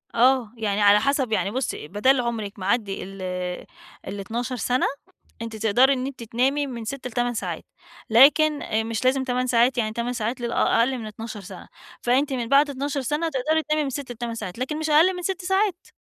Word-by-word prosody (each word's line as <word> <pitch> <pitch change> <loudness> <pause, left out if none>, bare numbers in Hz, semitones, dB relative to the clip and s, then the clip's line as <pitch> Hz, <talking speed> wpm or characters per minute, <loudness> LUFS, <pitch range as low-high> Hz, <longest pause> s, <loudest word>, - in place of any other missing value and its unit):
آه، 250 -2 +3
يعني 210 -2 -1
على 205 0 +6
حسب 265 0 0
يعني 205 -2 0
بُصّي 255 - -3
بَدال 250 - +2
عُمرِك 220 -4 -4
معَدّي 200 +1 -1
ال 195 0 -9 0.9
ال12 225 +6 -4
سَنة، 250 +1 0 0.6
أنتِ 230 -1 -5
تقدَري 225 +6 +4
إن 255 -1 -2
أنتِ 250 -4 -8
تنامي 270 +6 0
من 235 -3 -6
6 255 +1 -5
ل8 245 0 -1
ساعات 225 - -4 0.5
لكن 290 +5 +5
آآ 220 +1 -1
مش 225 +1 -3
لازم 265 +1 +3
8 255 0 -1
ساعات 245 +1 +3
يعني 215 -2 0
8 235 +2 -2
ساعات 240 +1 -3
لل 235 0 -2
أ - - +1 0.2
أقَلّ 255 +3 +2
من 225 - -7
12 215 0 -7
سَنة 185 - -11 0.3
فَأنتِ 270 +4 +1
من 240 -3 -3
بَعد 285 +1 +5
12 280 0 -3
سَنة 300 +6 -1
تقدَري 310 +4 0
تنامي 305 0 0
من 280 - -2
6 270 -1 -5
ل8 235 -1 -5
ساعات 185 -2 -6
لكَن 285 +4 -2
مش 315 - -2
أقَلّ 330 +5 +5
من 360 - -5
6 375 +1 -2
ساعات. 380 0 0
245 Hz, 200 wpm, -24 LUFS, 225-275 Hz, 0.9 s, على